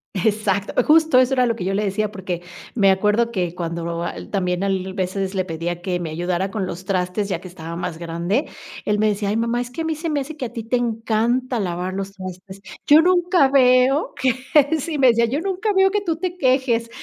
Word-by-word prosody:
Exacto. 205 0 0
Justo 315 -2 +5
eso 255 +1 +3
era 255 -1 +3
lo 230 - 0
que 200 - -5
yo 195 +2 -1
le 210 - 0
decía, 210 +1 -1
porque 185 -4 -5 0.3
me 195 -4 +4
acuerdo 210 +5 +2
que 180 -5 -2
cuando 170 -1 -4
al - - -6
también 180 -2 -1
a 200 - +1
él 190 0 -2
veces 190 +1 -2
le 185 -1 0
pedía 170 +1 -4
que 180 -1 -1
me 170 -2 -4
ayudara 175 +4 -2
con 195 -2 -3
los 180 +1 -6
trastes, 190 +1 -1
ya 175 - -1
que 185 - -10
estaba 165 -2 -8
más 165 -1 -4
grande. 170 - -1 0.4
Él 210 - +1
me 215 +1 +2
decía: 205 -1 -1
"Ay, 215 - 0
mamá, 235 +1 0
es 245 - -5
que 250 +6 -6
a - - -1
mí 320 - 0
se 325 +2 -4
me 295 - 0
hace 295 +3 -7
que 270 -4 -4
a 235 - -7
ti 230 - -5
te 230 +3 0
encanta 235 +1 0
lavar 180 0 -3
los 195 0 -4
trastes. 185 0 -9 0.3
Yo 300 +2 +8
nunca 355 -4 +3
veo 260 +1 +4
que" 260 -2 +2 0.5
Sí, 310 +2 -3
me 265 -2 +5
decía: 235 0 +3
"Yo 270 +7 -2
nunca 390 +3 -1
veo 385 0 +4
que 415 0 0
tú 330 -5 -2
te 360 +1 -4
quejes 255 -5 +1
210 Hz, 235 wpm, -21 LUFS, 185-255 Hz, 0.5 s, Yo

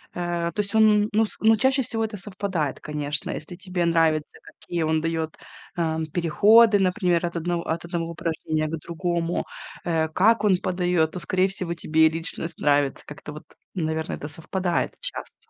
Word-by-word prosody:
Э, 175 -1 -2
то 210 - -7
есть 200 +1 -3
он 215 -1 +5
ну 220 +1 +4
с - - -10
ну 220 0 +5
чаще 265 +4 +3
всего 225 -2 -2
это 215 -1 -4
совпадает, 190 -7 -3
конечно. 150 0 -3
Если 160 +3 -6
тебе 185 -1 -2
нравится, 160 -2 +1
какие 170 -2 -5
он 160 0 +1
дает, 160 -1 -2 0.4
э, 160 -2 0 0.2
переходы, 205 +6 +5
например, 180 -2 +1
от 170 - -4
одного 170 0 -1
от 165 +1 -2
одного 170 -1 -3
упражнения 160 -2 -2
к 165 +2 -3
другому, 170 +1 -2 0.4
э, 160 -2 +1
как 210 +7 +3
он 195 -3 +4
подает, 180 -3 0
то 180 - -5
скорее 185 +2 +1
всего 185 -3 -3
тебе 160 -1 +3
личность 165 +1 -5
нравится. 145 -2 +1
Как-то, 150 0 -9
вот 150 - -10 0.3
наверное, 160 -2 -2
это 145 - -6
совпадает 175 +4 -2
часто. - - -5
170 Hz, 170 wpm, -24 LUFS, 160-190 Hz, 0.4 s, он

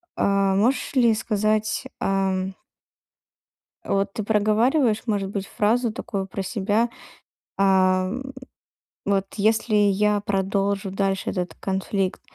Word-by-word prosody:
а, 195 -1 +2
можешь 245 +8 +1
ли 240 -3 +5
сказать, 215 +1 0 0.2
а, 195 0 +1
м 190 0 -3 1.3
вот 195 0 -1
ты 215 - -3
проговариваешь, 220 +3 +2
может 200 -3 -1
быть, 200 -1 -4
фразу 225 +3 +1
такую 200 -4 -4
про 195 +1 -5
себя: 210 +3 0 0.7
"А, 185 -1 +3
м, 265 +5 -5 0.7
вот 195 -1 +1
если 220 +1 +2
я 205 0 +3
продолжу 195 0 -1
дальше 195 -1 -1
этот 180 -3 -3
конфликт, 190 0 -2
200 Hz, 115 wpm, -23 LUFS, 195-215 Hz, 1.3 s, ли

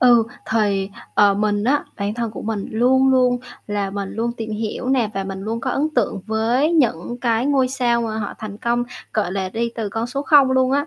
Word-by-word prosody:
Ừ, 240 -2 +6 0.3
thì, 200 -3 +1 0.2
ờ, 205 -1 +5
mình 205 0 0
á, 285 +4 +2
bản 205 0 -2
thân 235 -2 -2
của - - -8
mình 210 -2 -2
luôn 260 +4 +3
luôn 250 -1 +3 0.3
là 205 -1 -2
mình 200 -1 -4
luôn 235 +2 -1
tìm 225 -2 -6
hiểu 220 +4 -3
nè 245 -5 +2
và 195 0 -2
mình 195 0 -5
luôn 225 +2 -3
có 260 - -2
ấn 290 +4 +1
tượng 200 - 0
với 235 +8 +1
những 240 - +1
cái 235 +1 +1
ngôi 270 -3 +3
sao 245 -2 +1
mà 220 -1 -3
họ 205 -2 -4
thành 210 -2 -7
công, 240 +1 0 0.3
gọi 205 -4 0
là, 190 -1 -2
đi 230 +4 -2
từ 220 -3 -3
con 225 +3 -2
số 275 +3 -3
không 285 -3 +5
luôn 260 0 +3
á, 285 +2 +1
230 Hz, 225 wpm, -21 LUFS, 205-255 Hz, 0.3 s, Ừ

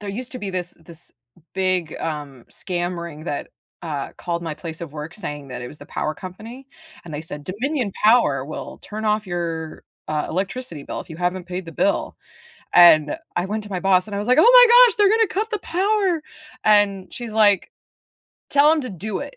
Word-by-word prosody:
There 205 -1 -5
used 250 +6 -6
to 255 - -5
be 205 -4 -4
this 180 -1 -3
this 165 +1 -11 0.4
big, 185 -4 0
um, 145 -5 -5
scam 175 -1 -3
ring 160 -2 -8
that, 145 - -4 0.3
uh, 150 -5 -4
called 170 -1 -3
my 160 -2 -4
place 160 +1 -8
of 165 -4 -7
work 150 +2 -7
saying 145 -8 -6
that 125 -1 -6
it 120 - -6
was 150 - -11
the - - -11
power 155 - -3
company, 220 - -10 0.4
and 170 - -9
they 145 - -3
said 150 -2 -7
"Dominion 240 - -2
Power 215 - +4
will 150 - -7
turn 215 +1 -6
off 210 0 +1
your, 165 -3 -4 0.2
uh, 155 -1 -1
electricity 190 - -4
bill - - -5
if - - -12
you 160 - -8
haven't 180 +1 -1
paid 180 0 -5
the 165 - -8
bill." 300 - 0 0.6
and 155 -4 +7 0.2
I 175 - 0
went 215 +2 -3
to 210 - -11
my 185 - -2
boss 190 0 +3
and 205 - -6
I - - -1
was 205 - -3
like, 255 - +4
"Oh - - +6
my - - +9 0.2
gosh, 455 - 0
they're 415 -1 +5
going 445 +2 +4
to - - -10
cut 430 +4 -1
the 425 - -1
power!" 380 -2 0 0.4
and 205 -3 +3
she's 240 -3 -6
like, 210 -3 +3 0.8
"Tell 285 +1 +5
them 315 -2 +2
to 255 - -5
do 195 +3 -4
it." 285 -1 -8
185 Hz, 215 wpm, -22 LUFS, 165-235 Hz, 0.8 s, my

